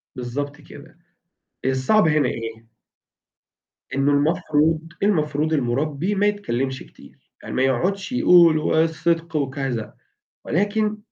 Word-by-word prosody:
بالضبط 140 +4 -5
كده. 150 +3 -14 0.7
الصعب 130 +10 +2
هنا 150 -4 +2
إيه؟ 115 0 -7 1.2
إنه 135 +1 +2
المفروض 155 +1 +1 0.2
المفروض 155 -5 +1
المُربِّي 145 +7 -1
ما 200 +1 +2
يتكلمش 135 -11 -2
كتير، - - -18 0.3
يعني - - -6
ما 130 - +2
يقعدش 185 - 0
يقول 175 -9 +5
والصدق 165 +1 0
وكذا. 135 -5 -3 0.5
ولكن 210 +4 0
150 Hz, 105 wpm, -22 LUFS, 135-170 Hz, 1.2 s, يقول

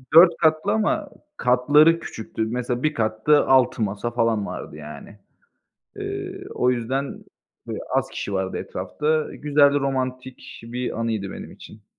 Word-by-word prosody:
4 170 +1 +8
katlı 160 +5 +2
ama 220 0 0 0.3
katları 145 +7 +4
küçüktü. 110 -4 -5
Mesela, 120 +1 -2
bir 155 0 +2
katta 110 +7 +2
6 130 -3 +4
masa 105 +3 -2
falan 115 -3 +1
vardı, - - -7
yani. 75 +7 -10 0.8
Eee, - - -5
o 125 0 +2
yüzden 130 +3 -3 0.4
böyle - - -4 0.2
az - - +1
kişi 100 - -5
vardı 95 -1 -2
etrafta. 150 +13 -2
Güzel, 145 -1 +3
romantik 130 -1 -4
bir 120 0 -4
anıydı 110 -4 -2
benim - - -9
için. 105 -1 -14
125 Hz, 135 wpm, -23 LUFS, 110-145 Hz, 0.8 s, 4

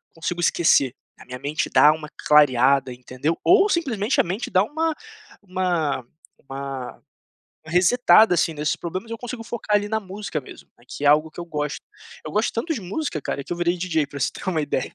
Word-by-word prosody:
consigo 175 +2 -3
esquecer, 140 -7 +3 0.3
a - - -14
minha 125 0 -8
mente 150 +4 -2
dá 150 - +6
uma 155 -1 -8 0.2
clareada, 135 -2 +4
entendeu? 130 +6 -3
Ou 395 +3 +5
simplesmente 255 - 0
a - - -2
mente 190 +7 -4
dá 185 +1 +4
uma 320 +5 -1 0.5
uma 175 -8 -1 0.3
uma 135 -1 -7 0.6
resetada, 190 +5 +5
assim, 165 0 +1
nesses 150 0 -1
problemas, 185 +6 -6
eu 230 - -4
consigo 245 0 -7
focar 225 -3 0
ali 205 0 -3
na 220 - 0
música 195 -5 -5
mesmo, - - -14
né, - - -23
que 145 - -6
é - - +5
algo 155 +2 +4
que - - -11
eu 170 - -5
gosto. 150 -3 -3 0.5
Eu - - -5
gosto 215 +2 0
tanto 260 +9 -2
de 235 - -5
música, 185 - -4
cara, 140 - -3
que - - -5
eu - - -7
virei 175 +1 0
DJ 165 -4 0
pra 140 0 -8
você 125 - +1
ter - - -10
uma 160 -4 0
ideia. 145 -3 -2
170 Hz, 200 wpm, -23 LUFS, 145-210 Hz, 0.6 s, dá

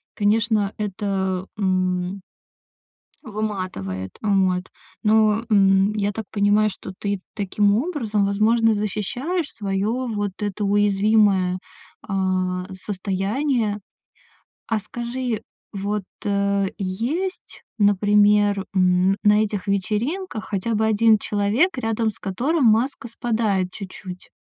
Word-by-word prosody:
Конечно, 210 -1 +1
это, 195 -2 -2
м 185 -1 0 1.0
выматывает. 185 - -4
Вот. 190 -3 +1 0.3
Но, 215 0 +3
м, 195 0 +4
я 205 -1 0
так 220 +1 -5
понимаю, 205 +1 +3
что 190 - -9
ты 200 -1 -2
таким 205 0 +1
образом, 230 - 0
возможно, 220 +3 +3
защищаешь 245 - -2
свое 195 -1 -2
вот 225 -5 -2
это 205 0 -3
уязвимое, 200 -2 +3 0.5
а, 185 -2 -1
состояние. 205 +4 -1 0.9
А 225 -2 0
скажи 240 +2 -4 0.3
вот, 205 +1 -2 0.2
э, 200 -1 +1
есть, 240 - -3
например, 205 0 +3
м, 185 +1 +3
на 210 +1 +5
этих 205 -2 -4
вечеринках 220 - -2
хотя 210 +3 -2
бы 220 +1 +1
1 220 0 +4
человек, 215 - +1
рядом 225 -2 0
с 210 - -10
которым 260 - 0
маска 230 +4 +2
спадает 220 -6 0
чуть-чуть? 185 -2 -9
205 Hz, 105 wpm, -22 LUFS, 195-220 Hz, 1.0 s, на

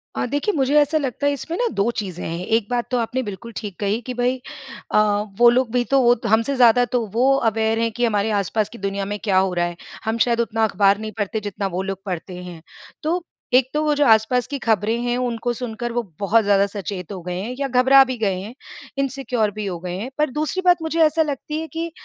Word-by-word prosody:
अ, - - -1
देखिए, 290 - -1
मुझे 270 +1 +1
ऐसा 295 +2 +2
लगता 280 -1 -2
है, 285 - +2
इसमें 325 +4 -5
ना 485 - +1
2 200 +4 +3
चीज़ें 185 -4 -6
हैं। 170 +2 -4
एक 225 0 +1
बात 245 -1 0
तो 250 - +2
आपने 245 +2 -1
बिल्कुल 220 +2 -7
ठीक 205 -4 -6
कही 205 +2 0
कि 250 +2 -6
भई 245 +1 0 0.5
अ, - - +3 0.4
वो 240 0 +7
लोग 245 -1 +1
भी 245 0 +2
तो 275 - +5
वो 240 -1 +5
त 245 - -12
हमसे 230 +5 -1
ज़्यादा 245 -1 +5
तो - - +4
वो 255 +4 +4 0.2
अवेयर 220 0 0
हैं 230 0 +1
कि 240 +3 0
हमारे 210 -1 +1
आसपास 210 +2 -1
की 235 - -11
दुनिया 195 -1 -3
में 205 +1 -3
क्या 200 -4 +2
हो 190 -1 +2
रहा 175 -1 +1
है। 175 0 -4 0.3
हम 220 +1 0
शायद 235 -1 +1
उतना 225 -1 0
अखबार 200 -1 +3
नहीं 215 0 -5
पढ़ते, 210 +1 -1
जितना 205 -1 -3
वो - - 0
लोग 195 -1 -5
पढ़ते 185 -1 -5
हैं। 175 -2 -9 0.4
तो 340 +3 0 0.3
एक 255 0 +5
तो 300 - +1
वो 300 -1 +2
जो 290 0 +3
आसपास 225 +1 +3
की 285 - -4
खबरें 220 -1 +1
हैं, 245 0 0
उनको 245 -1 -1
सुनकर 240 0 -5
वो 240 +1 0 0.2
बहुत 215 +3 +3
ज़्यादा 200 -1 +4
सचेत 195 -3 -6
हो 190 -3 -6
गए 180 0 -4
हैं 230 +6 -5
या 280 - 0
घबरा 260 +1 +6
भी 255 -1 -4
गए 195 -5 0
हैं, 205 +5 -8 0.4
इनसिक्योर 260 -5 -1
भी 210 0 -5
हो 180 -3 -4
गए 175 0 -5
हैं। 220 +7 -5
पर 300 0 +2
दूसरी 305 +6 -2
बात 355 -1 +6
मुझे 320 +1 -2
ऐसा 315 +1 +3
लगती 300 +1 -4
है 320 - -5
कि 330 +1 -3
230 Hz, 245 wpm, -21 LUFS, 205-260 Hz, 0.5 s, वो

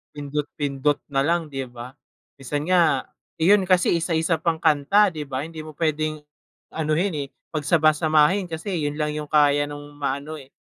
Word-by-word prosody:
Pindot-pindot 145 -1 -2
na 135 -1 0
lang, 165 +2 0
di 135 -2 -4
ba. 125 +1 -10 0.4
Minsan 145 +3 -4
nga 180 -2 +3 0.3
yun 195 +4 +5
kasi 180 -2 +3
isa-isa 165 0 +1
pang 160 0 -1
kanta, 160 +8 +4
di 160 -5 -4
ba? 135 -2 -4
Hindi 160 +1 -7
mo 155 - -9
pwedeng 155 -1 -1 0.5
anohin, 160 +4 -1
eh, - - -14 0.3
pagsama-samahin 155 +3 +3
kasi 165 +4 -4
yun 145 +1 -3
lang 150 0 -1
yung 150 -1 -6
kaya 145 -1 +4
nung 145 0 -8
maano, 145 +2 -3
eh, 140 -3 -13
150 Hz, 160 wpm, -23 LUFS, 145-165 Hz, 0.5 s, yun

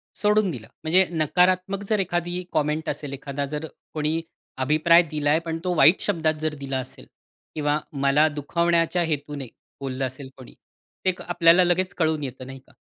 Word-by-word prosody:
सोडून 210 -1 +2
दिलं. 115 -7 -8 0.2
म्हणजे 180 +4 +4
नकारात्मक 180 +4 +1
जर 215 -2 +2
एखादी 175 -1 -2
कॉमेंट 155 +1 0
असेल 145 -2 -4
एखादा 140 0 -4
जर 150 +2 -5 0.3
कोणी 155 +1 -1 0.4
अभिप्राय 155 +5 +5
दिलाय, 150 0 +2
पण 165 -1 -4
तो 180 -1 0
वाईट 155 +4 +6
शब्दात 160 -6 0
जर 155 -1 -1
दिला 135 -1 -3
असेल 130 - -9 0.5
किंवा 150 -1 +1 0.2
मला 140 +3 +4
दुखावण्याच्या 170 +4 0
हेतूने 145 -4 -3 0.3
बोललं 135 0 -2
असेल 130 +1 -7
कोणी, 130 - -12 0.5
ते - - +5
एक 185 - -3
आपल्याला 175 0 +4
लगेच 180 +1 +1
कळून 160 -3 +1
येतं 130 -1 -6
नाही 135 0 -9
का? 130 - -25
155 Hz, 165 wpm, -24 LUFS, 145-175 Hz, 0.5 s, वाईट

